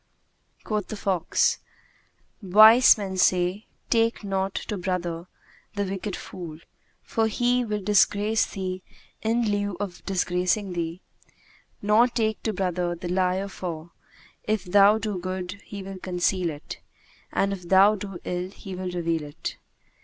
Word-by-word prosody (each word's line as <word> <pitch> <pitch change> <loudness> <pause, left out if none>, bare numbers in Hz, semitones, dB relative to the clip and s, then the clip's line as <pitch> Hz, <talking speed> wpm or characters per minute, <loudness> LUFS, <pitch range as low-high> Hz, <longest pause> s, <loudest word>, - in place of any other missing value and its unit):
Quoth 210 -3 -2
the 215 - -6
fox, 185 -4 +1 0.8
"Wise 215 +6 +8
men 195 -3 -4
say, 185 +2 +2 0.2
'Take 230 -1 +2
not 195 -1 -2
to 210 - -3
brother 175 -2 -3 0.5
the 205 - 0
wicked 195 0 -4
fool, 165 -4 -8 0.5
for 225 -1 0
he 245 +3 +1
will 210 -3 -3
disgrace 210 +2 +3
thee 185 -2 -4 0.4
in 230 +2 +1
lieu 205 -3 -1
of 195 -4 -5 0.2
gracing 180 +2 0
thee; 170 +1 -4 0.8
nor 215 +4 +5
take 225 -3 -1
to 220 - -1
brother 180 -3 -1
the 175 +1 -6
liar 185 +1 +1
for, 170 -4 -6 0.5
if 215 -1 0
thou 200 +3 +5
do 210 -3 -3
good, 185 +2 -5
he 200 -2 -7
will 190 0 -8
conceal 180 -1 0
it; 150 -1 -8 0.5
and 195 0 +1
if 180 -3 -8
thou 195 +2 +6
do 195 -3 -6
ill 180 +1 -3
he 195 0 -10
will 185 0 -4
reveal 170 -2 -1
it.' 145 0 -6
190 Hz, 140 wpm, -25 LUFS, 180-210 Hz, 0.8 s, Wise